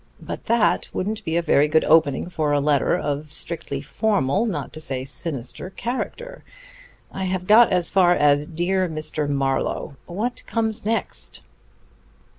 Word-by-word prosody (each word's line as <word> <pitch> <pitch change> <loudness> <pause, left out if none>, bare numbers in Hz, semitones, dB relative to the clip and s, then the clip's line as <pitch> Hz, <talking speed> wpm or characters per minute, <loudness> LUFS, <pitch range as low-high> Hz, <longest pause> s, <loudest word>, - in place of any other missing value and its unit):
But - - -7
that 230 -1 +2
wouldn't 210 +3 -3
be 160 +1 0
a 170 - +1
very 150 -2 +4
good 160 +1 +3
opening 155 -1 +3
for 155 -4 -1
a 145 - +3
letter 145 -1 +2
of 145 +1 -3
strictly 150 -3 -4
formal, 200 - 0
not 200 - -4
to 155 - -7
say 130 -4 -3
sinister 140 +2 -4
character. 480 - -5 0.7
I 190 - -4
have 185 -1 -2
got 220 +3 +7
as 180 -2 +1
far 180 -2 +5
as 145 -1 +3
'Dear 180 +2 0
Mr. 155 -1 -3
Marlowe.' 135 0 -1
What 215 +8 -3
comes 225 -1 -2
next?" 225 +1 -3
170 Hz, 150 wpm, -23 LUFS, 145-205 Hz, 0.7 s, got